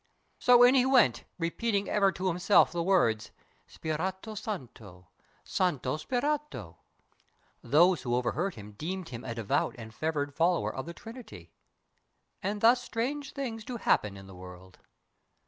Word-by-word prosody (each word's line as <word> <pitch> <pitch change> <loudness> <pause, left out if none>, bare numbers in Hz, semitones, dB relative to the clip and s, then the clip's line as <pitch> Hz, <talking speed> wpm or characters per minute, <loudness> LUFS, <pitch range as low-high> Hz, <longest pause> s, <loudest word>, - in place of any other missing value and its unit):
So 245 -1 +6
in 245 +1 +7
he 260 -2 +5
went 260 -2 +3
Repeating 200 +4 -1
ever 200 -2 +3
to 185 0 -3
himself 180 +3 +4
the 175 - -2
words 165 - +2 0.4
"Spirito 185 +7 -4
Santo! 115 - -8 0.3
Santo 150 -7 -1
Spirito!" 255 - -3 0.8
Those 170 +8 +4
who 120 -1 -1
o'erheard 155 +10 -1
him 105 -1 -10
deemed 170 - -5
him 120 -1 -7
a 115 -2 -5
devout 115 -3 0
And 110 -2 -10
fervid 145 0 -2
follower 170 +3 +1
of 130 +3 -6
the 170 - -7
Trinity. 235 +1 -11 0.9
And 205 +2 -3
thus 240 +2 +5
strange 270 +5 -3
things 230 -5 -4
do 245 +2 -5
happen 105 - +1
in 95 - -11
the 95 - -12
world. 90 0 -12
175 Hz, 145 wpm, -29 LUFS, -, 0.9 s, in